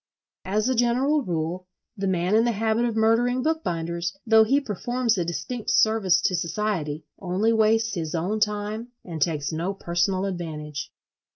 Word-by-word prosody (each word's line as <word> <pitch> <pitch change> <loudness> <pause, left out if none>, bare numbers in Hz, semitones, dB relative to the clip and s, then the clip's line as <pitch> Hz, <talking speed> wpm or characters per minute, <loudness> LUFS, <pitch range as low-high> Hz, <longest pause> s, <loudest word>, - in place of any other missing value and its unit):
As 210 +4 0
a 260 - +2
general 255 +5 +2
rule, 175 - -3 0.3
the 195 -2 -2
man 180 +1 0
in 220 +1 +5
the 240 0 +1
habit 220 +2 +1
of 230 -2 -1
murdering 235 +3 +2
bookbinders, 170 - -2
though 220 -1 +6
he 270 +6 +3
performs 240 0 -1
a 180 - 0
distinct 210 +7 -4
service 220 -5 +4
to - - +1
society, 170 -4 -2
only 195 +5 +1
wastes 225 0 +3
his 165 -3 -3
own 185 +7 -1
time 210 +2 -1 0.2
and 165 -4 -6
takes 150 -2 0
no 170 +5 -2
personal 185 +1 0
advantage. 155 -6 -5
205 Hz, 160 wpm, -25 LUFS, 170-225 Hz, 0.3 s, though